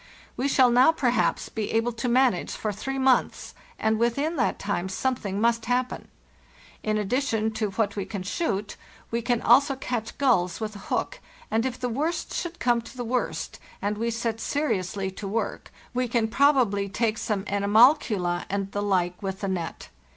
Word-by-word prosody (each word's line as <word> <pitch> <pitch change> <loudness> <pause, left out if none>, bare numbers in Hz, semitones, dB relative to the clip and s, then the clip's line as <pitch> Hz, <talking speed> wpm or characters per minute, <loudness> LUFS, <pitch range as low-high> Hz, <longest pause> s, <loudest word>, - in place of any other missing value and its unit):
We 260 - 0
shall 260 -3 +5
now, 250 +5 +6
perhaps, 250 -7 +1
be 220 -2 -4
able 225 +2 +2
to 240 +2 -3
manage 250 -6 +2
for 215 - -2
three 270 +7 -4
months, 265 -1 +1 0.2
and 220 0 +1
within 280 +8 +1
that - - +1
time 190 -2 -2
something 205 -2 -2
must 230 0 +2
hap 250 +1 +1
pen. - - -8 0.7
In 215 0 0
addition 220 0 0
to 220 -1 -2
what 200 +1 -1
we 200 -2 -3
can 200 -4 -5
shoot, 205 - -2 0.3
we 235 +1 0
can 240 0 0
also 275 +3 +5
catch 240 -4 -4
gulls 185 -11 +2
with 215 -1 -4
a - - -8
hook, - - -1 0.3
and 225 +3 +2
if 255 -1 -5
the 250 - -1
worst 295 +8 -2
should 345 -1 -3
come 240 -1 +2
to 230 +3 -13
the 245 - -3
worst, 250 +2 -2 0.2
and 205 +1 -1
we 230 +2 -1
set 230 -1 -2
seriously 200 -9 -1
to 195 +1 -7
work, 220 +3 -3 0.2
we 250 0 0
can 230 -1 +1
probably 235 -7 +3
take 225 +2 0
some 210 -3 -1
animalcula 200 - +3
and 195 0 -2
the 205 - -2
like 180 -3 0
with 195 0 -4
the 200 - -1
net. 175 -4 -4
225 Hz, 180 wpm, -26 LUFS, 200-250 Hz, 0.7 s, now